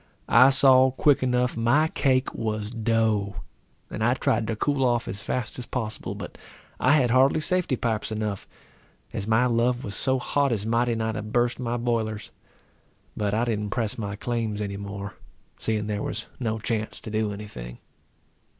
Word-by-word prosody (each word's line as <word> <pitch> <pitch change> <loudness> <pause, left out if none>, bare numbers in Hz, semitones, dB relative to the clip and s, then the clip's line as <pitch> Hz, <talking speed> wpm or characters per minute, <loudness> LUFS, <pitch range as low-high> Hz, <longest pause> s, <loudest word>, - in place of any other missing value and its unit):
I 130 +4 +7
saw 130 -1 +6
quick 135 +2 +3
enough 125 0 +1
my 125 +8 +3
cake 130 -3 +1
was 110 -1 -3
dough, 110 -3 0 0.6
and 110 - -3
I 120 +2 +3
tried 115 -3 0
to 115 - -1
cool 140 +4 0
off 120 -2 +1
as 100 +1 -4
fast 120 +2 -3
as 125 - -6
possible; 110 -4 -3
but - - -8 0.4
I 130 - +4
had 130 -6 +3
hardly 135 +4 +4
safety 175 -3 0
pipes 110 -3 -2
enough, 105 -2 -3 0.7
as 105 - -3
my 110 +3 +3
love 120 +1 +1
was 100 - -5
so 130 +6 +2
hot 140 +2 0
as 105 -3 -1
mighty 115 +1 +1
nigh 110 0 -1
to 110 - -4
burst 120 +3 0
my 120 -1 -2
boilers. 115 -3 -2 0.8
But 105 0 -1
I 115 +2 +1
didn't 105 -3 -2
press 110 0 -1
my 100 -2 -3
claims 115 -1 -2
any 100 -1 -3
more, 100 0 -6 0.5
seeing 110 -2 -1
there 105 -1 -2
was 110 - -4
no 110 -3 -1
chance 110 0 -3
to 110 - -7
do 110 -1 0
any 105 +1 -6
thing. - - -9
115 Hz, 180 wpm, -25 LUFS, 105-125 Hz, 0.8 s, I